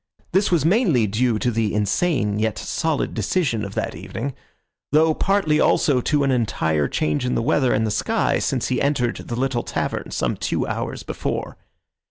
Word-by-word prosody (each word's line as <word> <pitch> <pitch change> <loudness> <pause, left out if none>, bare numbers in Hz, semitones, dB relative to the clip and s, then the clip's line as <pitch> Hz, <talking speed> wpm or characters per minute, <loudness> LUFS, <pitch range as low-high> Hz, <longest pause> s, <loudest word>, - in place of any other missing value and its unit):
This 195 +3 +2
was 165 -5 +2
mainly 170 - +3
due 110 +3 +1
to 120 +3 0
the 110 -3 0
insane 105 - +1
yet 110 0 0
solid 160 -3 -1
decision 135 - 0
of 100 -1 -6
that - - -2
evening, 140 0 -5 0.6
though 155 +2 +4
partly 195 -4 +1
also 135 -4 +3
to 145 +2 +1
an 135 - +2
entire 80 - +1
change 75 - -1
in 125 - 0
the 115 - 0
weather 135 -1 +2
and 110 +1 +2
the 110 - -1
sky 105 - +1
since - - -1
he 125 - 0
entered 130 -4 0
the 120 - -6
little 130 -2 0
tavern - - -3
some - - -1
two - - -1
hours - - -4
before. - - -4
125 Hz, 180 wpm, -22 LUFS, 110-150 Hz, 0.6 s, though